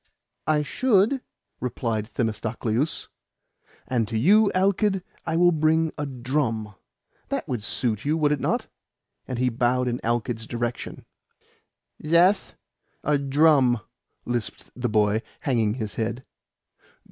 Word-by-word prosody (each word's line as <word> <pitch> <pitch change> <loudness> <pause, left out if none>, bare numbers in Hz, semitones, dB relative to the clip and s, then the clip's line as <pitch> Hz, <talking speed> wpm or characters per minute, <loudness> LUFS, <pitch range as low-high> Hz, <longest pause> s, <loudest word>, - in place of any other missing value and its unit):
"I 150 -1 +3
should," 230 - +2 0.4
replied 115 -4 -2
Themistocleus. 115 +4 -1 0.8
"And 120 -4 0
to 110 - -2
you, 205 - +5
Alkid, 195 0 +2 0.2
I 160 - 0
will 175 +1 +5
bring 160 0 +2
a 145 -1 -3
drum. 120 -4 -2 0.6
That - - -2
would 120 -4 -2
suit 110 0 -1
you, 150 +3 +1
would 150 -2 +2
it 150 - +1
not?" - - 0 0.6
And 130 - -3
he 125 +1 +2
bowed 125 +2 +1
in 120 0 -1
Alkid's 115 -1 -2
direction. 120 0 -4 1.0
"Zeth 175 +5 +3 0.5
a 150 -1 +2
drum," 140 -3 +4 0.5
lisped 120 -3 -3
the 125 -1 -1
boy, 105 0 +2 0.2
hanging 115 -5 +1
his 110 -5 -4
head. 115 +3 -3
125 Hz, 125 wpm, -25 LUFS, 115-155 Hz, 1.0 s, you